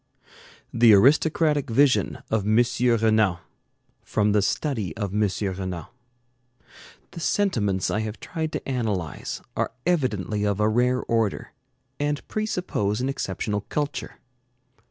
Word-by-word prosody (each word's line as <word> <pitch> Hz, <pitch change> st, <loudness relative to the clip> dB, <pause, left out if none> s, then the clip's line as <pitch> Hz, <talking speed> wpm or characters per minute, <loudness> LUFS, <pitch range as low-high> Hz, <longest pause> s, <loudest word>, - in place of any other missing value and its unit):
THE 115 Hz, -2 st, +6 dB
ARISTOCRATIC 145 Hz, +4 st, +3 dB
VISION 135 Hz, +3 st, +2 dB
OF 110 Hz, -2 st, +1 dB
M. 110 Hz, +4 st, +4 dB, 0.4 s
RENAN 110 Hz, -5 st, +3 dB, 0.6 s
From 105 Hz, 0 st, +1 dB
the 105 Hz, 0 st, +3 dB
'Study 105 Hz, -, -2 dB
of 100 Hz, -3 st, -3 dB
M. 105 Hz, -1 st, +2 dB, 0.3 s
Renan' 90 Hz, -3 st, -5 dB, 1.3 s
The -, -, -8 dB
sentiments 115 Hz, -, 0 dB
I -, -, 0 dB
have 110 Hz, 0 st, -4 dB
tried 160 Hz, -2 st, -4 dB
to -, -, -4 dB
analyze 105 Hz, -, -3 dB
are -, -, -1 dB
evidently 110 Hz, -, 0 dB
of 100 Hz, -1 st, 0 dB
a 105 Hz, -, +3 dB
rare 125 Hz, +3 st, +2 dB
order, 115 Hz, -3 st, -1 dB, 0.5 s
and 145 Hz, 0 st, -2 dB
presuppose 180 Hz, -, -1 dB
an 130 Hz, +2 st, -1 dB
exceptional 105 Hz, -4 st, -2 dB
culture. 145 Hz, 0 st, -3 dB
110 Hz, 120 wpm, -24 LUFS, 105-140 Hz, 1.3 s, THE